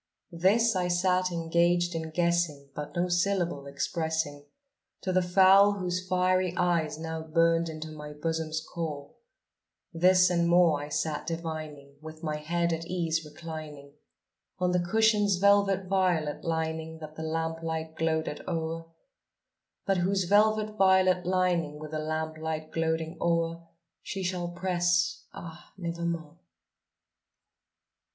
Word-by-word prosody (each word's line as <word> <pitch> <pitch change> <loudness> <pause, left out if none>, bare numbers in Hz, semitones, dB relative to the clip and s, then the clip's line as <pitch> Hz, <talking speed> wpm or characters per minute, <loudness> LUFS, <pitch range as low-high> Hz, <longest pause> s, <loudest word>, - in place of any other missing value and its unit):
This 200 +6 +3
I 180 -1 +1
sat 180 +1 +1
engaged 170 +1 +1
in 160 -1 -4
guessing, 170 -4 0
but 150 +1 -7
no 175 +1 +1
syllable 175 -5 0
expressing 145 0 -2 0.6
To 185 - -2
the 185 - +4
fowl 190 +3 +6
whose 185 -1 -3
fiery 185 -1 +1
eyes 165 -4 +1
now 160 0 -5
burned 165 +1 +2
into 155 0 -7
my 150 -1 -8
bosom's 160 +1 -2
core; 155 -4 -6 0.8
This 180 +2 +5
and 170 -1 +2
more 170 -4 +4
I 145 - -7
sat 150 0 -2
divining, 155 -4 -6
with 155 +1 -10
my 155 -1 -2
head 170 +2 -1
at 165 +1 -4
ease 165 -3 -1
reclining 150 -2 -9 0.6
On 180 -1 +1
the 180 - +2
cushion's 210 +2 +3
velvet 200 0 +3
violet 180 -6 0
lining 160 0 -2
that 155 -1 -10
the 160 - -7
lamp 160 +1 -2
light 160 -1 -4
gloated 160 -2 -1
o'er, 165 -1 -3 1.0
But 195 -1 +2
whose 190 +2 +1
velvet 215 +3 +2
violet 185 -2 +4
lining 180 -5 +1
with 155 0 -8
the 155 - -2
lamp 155 0 -3
light 155 0 -4
gloating 160 0 -2
o'er, 165 0 0 0.3
She 195 - -5
shall 180 -1 -2
press, 175 0 0
ah, 170 0 -11
nevermore! 170 -3 -4
170 Hz, 130 wpm, -28 LUFS, 160-180 Hz, 1.0 s, fowl